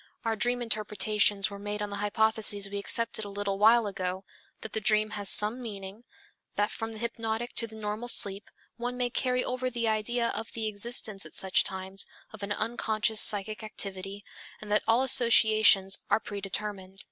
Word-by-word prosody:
Our 225 -1 0
dream 245 +2 0
interpretations 210 -2 +1
were 200 - -8
made 205 +1 -4
on 210 -1 -4
the 200 - -4
hypotheses 210 -1 0
we 200 0 -5
accepted 230 +2 0
a 205 - -7
little 200 -1 -4
while 225 +2 +5
ago, 185 -1 -4 0.4
that 220 - -8
the 220 - -2
dream 215 -1 +2
has 205 -2 0
some 215 +5 +5
meaning, 205 0 -9 0.5
that 205 +1 0
from 225 0 -6
the - - -9
hypnotic 230 +1 -4
to 230 - +2
the 220 - -13
normal 215 +2 -5
sleep 200 -3 +3 0.3
one 245 +1 -4
may 245 -1 -1
carry 250 0 0
over 255 0 -2
the 235 -2 -3
idea 230 +2 0
of 220 +2 -6
the 225 -1 -3
existence 215 -1 0
at - - -10
such 190 -1 +2
times 190 0 -2 0.3
of 220 - -10
an 200 +1 -5
unconscious 220 0 0
psychic 215 +1 +4
activity, 195 -2 -6 0.3
and 210 -1 -9
that 210 - +3
all 230 +3 +3
associations 220 -6 +4
are - - +3
predetermined. 200 -1 -5
215 Hz, 180 wpm, -28 LUFS, 200-230 Hz, 0.5 s, while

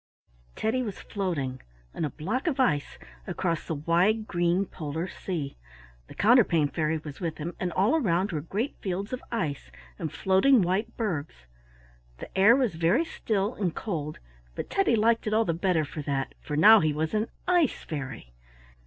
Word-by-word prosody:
Teddy 230 +4 0
was 210 -6 -5
floating 150 -10 -3 0.3
on - - -3
a - - -2
block 210 - -3
of 280 -5 0
ice 150 - +1 0.3
across 170 -3 -2
the 160 - -2
wide, 175 +9 +2
green 175 +2 +1
Polar 160 0 -4
sea. 165 -8 -5 0.5
The - - -12
Counterpane 200 - +4
Fairy 160 0 0
was 150 -2 -9
with 165 -4 -3
him, 165 +3 -4
and 180 -1 -1
all 200 +8 +3
around 195 - +1
were 155 -3 -2
great 210 - -3
fields 195 +4 -3
of 255 - -3
ice 160 - -3 0.3
and 160 -3 -3
floating 190 - +4
white 200 +6 -1
bergs. 155 - -3 0.7
The - - -10
air 200 +5 +7
was 255 -7 +1
very 170 - +2
still 210 -8 -1
and 185 -8 -2
cold, 155 -8 -4 0.4
but - - -5
Teddy 390 -11 +3
liked 225 +1 +2
it 215 - +1
all 225 +1 +3
the 170 - 0
better 170 -2 +1
for 150 +2 -6
that, 140 -2 -2
for 150 - -4
now 215 +7 +9
he 155 -4 +1
was 155 +1 -2
an 215 +1 +1 0.2
ice 350 -6 +2
fairy. 135 - -6
180 Hz, 175 wpm, -27 LUFS, 155-220 Hz, 0.7 s, now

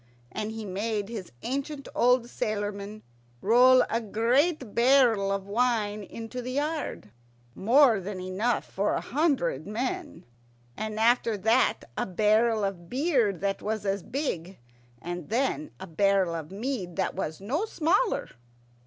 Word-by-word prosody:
And 215 0 -3
he 220 -1 -6
made 205 +2 -2
his 210 -6 -7
ancient 275 +3 -4
old 250 0 +4
sailormen 205 -1 -4 0.4
roll 250 - +6
a 230 - -1
great 245 - +1
barrel 235 -5 +4
of 195 -1 -2
wine 215 -1 0
into 230 +5 -7
the 250 +1 -5
yard, 295 - -3 0.4
more 235 - +4
than 190 0 -6
enough 190 +6 -1
for 200 +2 -1
a - - 0
hundred 255 - 0
men, 290 - -4 0.5
and 215 0 -4
after 230 -1 +3
that 225 +6 +2
a - - -2
barrel 215 +3 +2
of 180 -4 -4
beer 260 - +2
that 195 +2 -3
was 215 -1 -3
as 195 0 0
big, 190 - -4 0.4
and 175 0 -6
then 270 +6 0
a 190 - -6
barrel 190 0 +2
of 160 -2 -5
mead 200 -3 -4
that 190 - -1
was 160 -4 -4
no 270 - -1
smaller. 390 +4 0
220 Hz, 140 wpm, -27 LUFS, 195-255 Hz, 0.5 s, roll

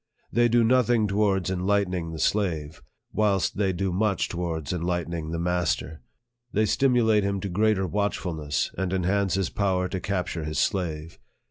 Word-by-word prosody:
They 120 0 +4
do 120 0 +3
nothing 120 -2 +3
towards 100 -2 +1
en 95 - -2
lightening 95 -5 0
the 80 - -6
slave, 80 -5 -1 0.3
whilst 100 -4 +1
they 100 -2 +2
do 95 +1 -1
much 100 0 0
towards 85 -3 -3
en 90 - -3
lightening 85 -2 -2
the 85 - -3
master. 85 -2 -1 0.5
They 110 0 +2
stimulate 115 -3 +3
him 100 0 -1
to 100 - -3
greater 100 +1 +2
watchfulness, 85 -7 -2
and 95 -1 -2
enhance 95 +1 +1
his 95 -3 -1
power 95 -3 0
to 95 - -3
capture 90 -4 -2
his 75 0 -4
slave. 80 -4 -1
95 Hz, 160 wpm, -26 LUFS, 85-105 Hz, 0.5 s, They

